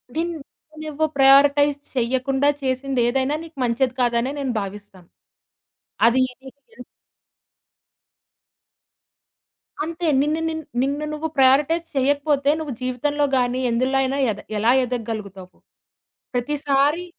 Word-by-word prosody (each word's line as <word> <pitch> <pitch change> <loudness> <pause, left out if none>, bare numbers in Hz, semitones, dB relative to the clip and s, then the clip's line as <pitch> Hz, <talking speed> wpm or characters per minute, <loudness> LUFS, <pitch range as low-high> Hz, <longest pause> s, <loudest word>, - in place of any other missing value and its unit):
ధిన్ 340 +2 -1 0.5
నువ్వు 310 0 -1
ప్రయరిటైజ్ 280 +1 +5 0.2
చేయ్యకుండా 260 +3 +1
చేసింది 260 0 -1
ఏదైనా 270 +3 0
నీకు 325 -3 -14
మంచిది 245 +2 0
కాదనే 240 +2 +1
నేను 265 -3 -2
భావిస్తాను. 195 -3 -10 1.0
అది 250 +2 +3
ఏది 265 +2 -16 0.3
ఎన్ - - -10 3.0
అంతే 335 +1 -4
నిన్ను 305 +2 0
నిన్ 320 0 -5 0.2
నిన్ను 285 +3 -1
నువ్వు 305 +1 -3
ప్రయారిటైజ్ 285 +6 +3
చేయకపోతే 285 +1 +1
నువ్వు 295 -5 -4
జీవితంలో 290 +4 -1
గాని 250 0 0
ఎందులో 260 +3 +1
అయినా 270 +1 -1
ఎద 205 - -7 0.2
ఎలా 225 +3 +3
ఎదగగలుగుతావు? 215 -6 -6 0.8
ప్రతిసారి 290 +5 0
270 Hz, 105 wpm, -22 LUFS, 245-290 Hz, 3.0 s, ప్రయరిటైజ్